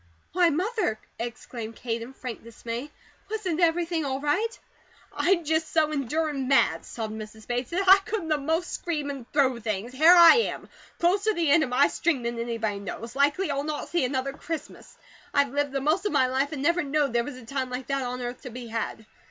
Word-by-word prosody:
"Why, 350 -1 +4
Mother!" 365 - 0 0.2
exclaimed 230 -1 -6
Kate 230 -1 -3
in 240 +3 -8
frank 250 -3 -7
dismay. 230 +3 -6 0.4
"Wasn't 385 -7 -2
everything 335 -1 +2
all 270 -1 -2
right?" 395 - 0 0.6
"I'm 350 -2 +2
just 315 +1 0
so 310 -1 +2
endurin' 290 0 -1
mad," 270 0 +3
sobbed 220 -2 -5
Mrs. 220 0 -9
Bates, 245 +1 -2
"that 370 +3 -1
I 385 +1 +9
could 390 -5 -4
a 305 - +3
most 320 +5 -1
scream 300 -4 -2
and 265 -4 -9
throw 265 -4 +2
things. 215 +1 -3
Here 320 +7 +7
I 340 +3 +9
am, 465 - -1 0.3
closer 395 +5 +2
the 330 -4 +1
end 320 +2 +6
of 275 - 0
my 255 +3 +4
string 310 -7 0
than 235 0 -3
anybody 225 -3 -2
knows. 225 +5 -7
Likely 290 +5 +2
I'll 280 0 -1
not 300 0 -4
see 345 -4 +1
another 260 +1 -1
Christmas. 315 +1 -7 0.4
I've 280 -2 +3
lived 285 -1 0
the 275 - -1
most 325 +8 +1
of - - -3
my 270 -3 +4
life, 265 +3 0
and 285 -3 -4
never 340 +4 +3
knowed 285 -2 0
there 235 0 +2
was 270 +2 -7
a 255 - -12
time 265 +1 -3
like 250 +1 -5
that 275 +1 -1
on 250 0 -4
earth 245 +1 -5
to 255 - -7
be 240 0 -8
had. 225 -1 -4
280 Hz, 210 wpm, -26 LUFS, 245-330 Hz, 0.6 s, I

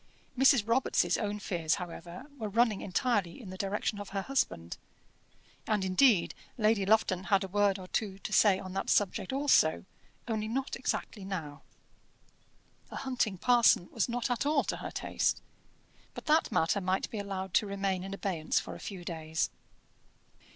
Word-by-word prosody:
Mrs. 265 -4 +5
Robarts' 240 +3 +2
own 210 -1 -2
fears, 170 -5 -1
however, 175 +4 -8
were 215 -2 -3
running 225 -1 +2
entirely 200 -2 0
in 205 -7 -9
the - - -7
direction 200 +2 -2
of 205 - -7
her 195 0 -3
husband; 85 - -1 0.9
and, 210 -3 +1
indeed, 190 0 +4 0.2
Lady 215 -3 +2
Lufton 195 -4 +2
had 195 +2 +3
a - - -4
word 200 0 +2
or 185 -1 -9
two 195 -1 -2
to - - -6
say 200 -3 +5
on 185 -1 -8
that 195 - -3
subject 200 0 +1
also, 270 - +3 0.4
only 220 -2 -2
not 260 +5 -2
exactly 230 -4 -3
now. 160 -7 -5 1.3
A - - -9
hunting 250 -7 -1
parson 235 -5 +4
was 225 +1 0
not 245 +1 -1
at 240 - 0
all 290 0 +2
to - - -3
her - - -6
taste; - - -1 0.8
but - - -8
that 310 +1 +3
matter 165 +5 +1
might 185 +1 0
be 220 - -4
allowed 190 -2 -5
to 215 - +3
remain 195 -2 -2
in 195 - -6
abeyance 190 -5 -1
for - - -7
a - - -9
few 185 -4 -7
days. 160 -2 -2
200 Hz, 165 wpm, -30 LUFS, 185-230 Hz, 1.3 s, Mrs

